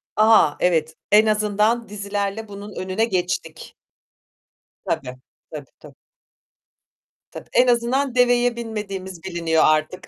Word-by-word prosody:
A, 215 -8 +4
evet. 160 -3 0 0.2
En 210 +1 +6
azından 215 +1 +1
dizilerle 205 +1 -4
bunun 205 +1 -9
önüne 185 +4 -1
geçtik. 180 -5 -4 1.1
Tabii, - - -1 0.5
tabii, 150 -3 -9
tabii. - - -15 1.4
Tabii, - - -11
en 250 - +4
azından 245 +2 +1
deveye 245 -1 +3
binmediğimiz 195 -6 -6
biliniyor 170 -3 0
artık. 155 +3 0
205 Hz, 105 wpm, -21 LUFS, 180-225 Hz, 1.4 s, En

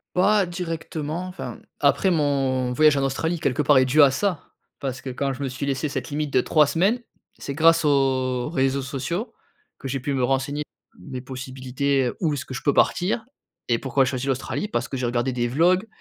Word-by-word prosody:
Pas 200 +2 +4
directement, 165 -1 -4
enfin, 180 - -6
mmh, - - -19 0.2
après, 190 - +3
mon 135 -5 +1
voyage 150 +1 +5
en 140 - +1
Australie, 160 +5 -1
quelque 150 -2 0
part, 140 -1 +5
est 130 - +5
dû 145 +4 +5
à 140 - +7
ça, 180 +2 -2 0.3
parce 130 -2 -4
que 130 - -5
quand 135 +2 -2
je 130 - -9
me 135 - -1
suis 130 +2 -4
laissé 140 +2 -1
cette 135 -1 -4
limite 150 -1 -2
de 130 - +4
3 150 +3 +4
semaines, 195 - +2 0.4
c'est 140 - -5
grâce 165 +1 +4
aux 130 -3 +1
réseaux 135 -3 +1
sociaux, 140 - -4 0.5
que - - -8
j'ai 135 +1 -2
pu 140 +2 -2
me 130 -2 0
renseigner, 135 +3 0 0.3
mes 130 -3 -7
possibilités, 130 0 -2
où 160 -4 +1
est-ce 135 - -4
que 130 - -8
je 135 - -5
peux 145 - +2
partir? 205 +5 +2 0.4
Et 115 -1 +2
pourquoi 135 0 +1
j'ai 130 - -1
choisi 130 0 -3
l'Australie? 135 +9 -2
Parce - - -2
que 135 - -4
j'ai 125 -1 -1
regardé 120 +2 0
des 120 -1 0
vlogs 175 - +2
140 Hz, 210 wpm, -24 LUFS, 130-160 Hz, 0.5 s, à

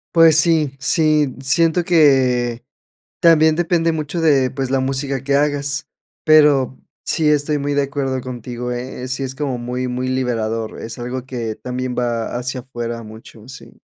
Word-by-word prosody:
Pues 165 -2 +7
sí, 155 -5 +1
sí, 150 -1 +2
siento 165 +5 +2
que 130 -7 +3 0.6
también 160 -2 +5
depende 170 -1 +1
mucho 155 +2 -3
de 140 -6 +3
pues 135 -1 -3
la 135 0 +1
música 135 0 -2
que 140 0 +1
hagas, 145 -1 -1 0.4
pero 145 -5 +4 0.3
sí 155 -2 +1
estoy 150 0 +1
muy 145 +1 -2
de 145 - +2
acuerdo 135 -1 -2
contigo, 125 -1 -6
¿eh?, 125 +1 -6
sí, 135 +1 -3
es 130 0 -5
como 135 -4 -2
muy, 125 +1 -4
muy 125 +1 -3
liberador, 115 -3 -2
es 115 +2 -7
algo 125 +1 -5
que 115 -4 -4
también 125 0 -4
va 120 -1 -2
hacia 125 +1 -4
afuera, 120 -2 -6
mucho, 110 +1 -13
sí. 135 +1 -13
130 Hz, 160 wpm, -19 LUFS, 125-150 Hz, 0.6 s, Pues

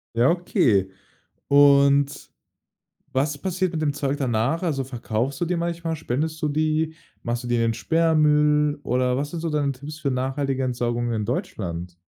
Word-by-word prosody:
Ja, 120 +3 +4
okay 115 - +2 0.6
und 140 0 +4 0.8
was 145 +2 0
passiert 185 +2 -1
mit 155 - -2
dem 145 -2 +1
Zeug 140 0 -2
danach? 130 +3 0
Also, 145 -6 0
verkaufst 125 0 -3
du 175 - 0
die 180 +2 -1
manchmal, 170 -1 -2
spendest 155 +2 -3
du 150 - 0
die? 155 +1 0 0.3
Machst 120 +1 -3
du - - -6
die 120 - 0
in 115 - +1
den 115 0 +1
Sperrmüll 150 +2 +2
oder 125 0 +1
was 145 +2 -2
sind 170 - -5
so 165 - -2
deine 145 -2 +1
Tipps 145 +4 -9
für 140 -2 -1
nachhaltige 135 +1 -1
Entsorgung 120 -1 -1
in 110 -1 -1
Deutschland? 90 -6 -4
140 Hz, 170 wpm, -24 LUFS, 125-155 Hz, 0.8 s, Ja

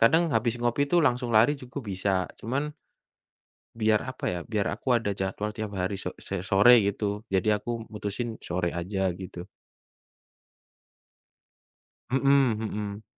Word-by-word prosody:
kadang 160 +10 +5
habis 120 -2 +2
ngopi 120 +3 +1
tuh 175 - +6
langsung 125 -1 0
lari 115 +6 +6
juga 125 +3 -7
bisa. 95 -1 0
Cuman 140 +6 -2 1.1
biar 110 +1 +2
apa 130 -1 -6
ya, 90 - -2
biar 105 -3 -1
aku 130 - -6
ada 115 -3 +1
jadwal 100 +2 -2
tiap 105 -2 -5
hari 95 +1 -2
so 90 -1 -5
se 100 - -2
sore 105 +6 +7
gitu. 105 +1 -2
Jadi 95 0 +1
aku 105 +3 0 0.2
mutusin 110 +2 -4
sore 90 0 -2
aja 95 +2 -1
gitu. 90 -2 -8 2.6
Mhm 135 -3 +4
mhm. 105 -1 -4
105 Hz, 135 wpm, -27 LUFS, 95-120 Hz, 2.6 s, sore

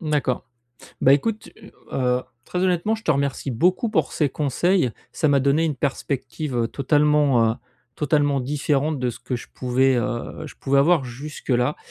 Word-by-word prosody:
D'accord. 150 -6 -1 0.6
Bah 135 - +6
écoute, 215 +10 0
heu, 210 -1 -15 0.2
heu, 125 -1 +1 0.2
très 180 - -4
honnêtement, 185 +4 +1
je 225 - -8
te 165 - 0
remercie 140 -1 0
beaucoup 180 - +2
pour 160 -8 0
ces 150 - +1
conseils, 150 +2 +1 0.2
ça 155 - 0
m'a 140 -1 +4
donné 140 +4 +2
une 155 -3 0
perspective, 135 0 -3
heu, 115 -1 +1
totalement, 145 -4 +3
heu, - - -5 0.4
totalement 145 -2 +1
différente 145 +2 0
de 125 - -1
ce - - -10
que 125 0 -4
je - - -9
pouvais, 130 +1 +2
heu, 120 0 -3
je - - -11
pouvais 140 0 +1
avoir 155 0 +4
jusque-là. 130 0 -2
140 Hz, 170 wpm, -23 LUFS, 130-155 Hz, 0.6 s, Bah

